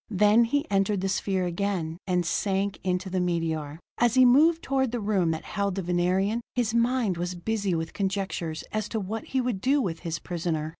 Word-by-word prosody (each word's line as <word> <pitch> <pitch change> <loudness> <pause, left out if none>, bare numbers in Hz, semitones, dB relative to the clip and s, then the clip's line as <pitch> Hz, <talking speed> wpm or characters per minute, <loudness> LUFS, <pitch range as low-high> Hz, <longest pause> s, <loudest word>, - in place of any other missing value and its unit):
Then 210 +3 +4
he 285 +5 0
entered 195 0 +1
the 195 - -1
sphere 190 -1 0
again, 175 -2 -2
and 180 -2 +1
sank 195 +3 -1
into 185 +1 -1
the 185 0 -1
meteor. 165 -4 -2 0.2
As 240 0 +3
he 255 0 +7
moved 315 +7 +5
toward 265 -3 0
the 240 - -2
room 200 -5 +1
that 160 0 -2
held 200 -2 -2
the 195 - -2
Venerian, 185 +6 +1
his 235 -3 0
mind 235 -5 +1
was 175 +1 -3
busy 200 0 -1
with 160 0 -3
conjectures 190 -5 -2
as 215 -1 -2
to 225 - -2
what 215 +3 -4
he 265 - 0
would 240 -6 -2
do 275 +5 +3
with 170 -10 -2
his 165 -2 -3
prisoner. 160 -2 -3
195 Hz, 200 wpm, -27 LUFS, 175-225 Hz, 0.2 s, he